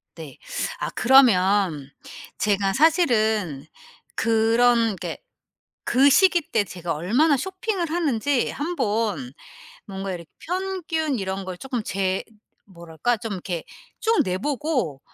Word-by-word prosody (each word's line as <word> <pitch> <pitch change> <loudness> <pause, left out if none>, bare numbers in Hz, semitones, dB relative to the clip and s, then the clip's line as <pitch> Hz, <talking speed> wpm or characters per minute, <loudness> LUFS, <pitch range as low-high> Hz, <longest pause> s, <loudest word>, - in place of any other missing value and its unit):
네. - - -10 0.4
아 - - -2
그러면 195 - +4 0.5
제가 200 -2 +1
사실은 220 - +2 0.5
그런 230 0 +3
게 - - -6 0.7
그 270 +3 +4
시기 360 +5 +5
때 205 - +2
제가 175 -3 -5
얼마나 245 - +2
쇼핑을 375 - -3
하는지 285 -6 0
한번 215 - -2 0.5
뭔가 195 -1 -5
이렇게 170 -2 -8
평균 335 - -2
이런 190 0 -4
걸 185 -1 -6
쪼끔 245 +1 -4
재 190 -1 -1 0.4
뭐랄까? 170 +5 -3
좀 215 -1 -5
이렇게 175 -3 -4 0.4
쭉 455 -2 +2
내 185 -1 -1
보고 260 - -2
225 Hz, 215 characters per minute, -23 LUFS, 190-290 Hz, 0.7 s, 시기